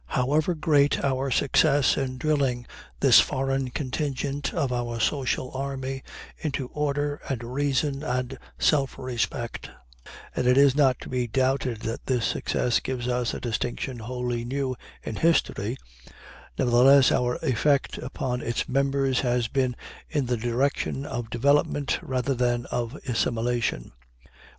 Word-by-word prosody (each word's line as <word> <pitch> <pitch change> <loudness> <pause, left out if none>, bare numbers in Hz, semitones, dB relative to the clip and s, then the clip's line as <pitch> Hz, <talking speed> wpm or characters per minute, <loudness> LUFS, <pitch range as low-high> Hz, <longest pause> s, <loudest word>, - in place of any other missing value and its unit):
However 150 +7 +1
great 145 -3 +2
our 135 0 0
success 140 +2 +3
in 130 -2 -2
drilling 135 -4 0 0.4
this - - +8
foreign 135 0 0
contingent 140 +1 -2
of 140 -7 -1
our 120 -1 -2
social 130 0 0
army 135 0 -4 0.4
into 135 -4 -3
order 145 0 -1
and 125 -4 -2
reason 140 +2 -1
and 125 -3 -2 0.2
self 140 -4 +2
respect 120 -2 -3 0.7
and 125 - 0
it 125 +1 +5
is 140 -1 +6
not 135 -4 +3
to - - -8
be 125 -1 -1
doubted 130 -1 0
that 115 - -5
this 125 -3 +1
success 120 - 0
gives 125 -2 -4
us 125 -1 0
a - - -4
distinction 120 +2 -3
wholly 120 +1 -3
new 130 +1 -2 0.3
in 110 - -5
history 130 -8 +1 0.8
nevertheless 130 +2 +6
our 125 0 +1
effect 140 +3 +1
upon 125 -1 -3
its 115 - -2
members 135 0 +1
has 125 -2 +1
been 130 0 0 0.3
in 145 -4 0
the 125 0 0
direction 125 +4 -1
of 120 -5 -4
development 140 +3 +1
rather 130 +1 -1
than 120 -1 0
of 120 +2 -2
assimilation. 115 - -1
130 Hz, 135 wpm, -26 LUFS, 120-140 Hz, 0.8 s, this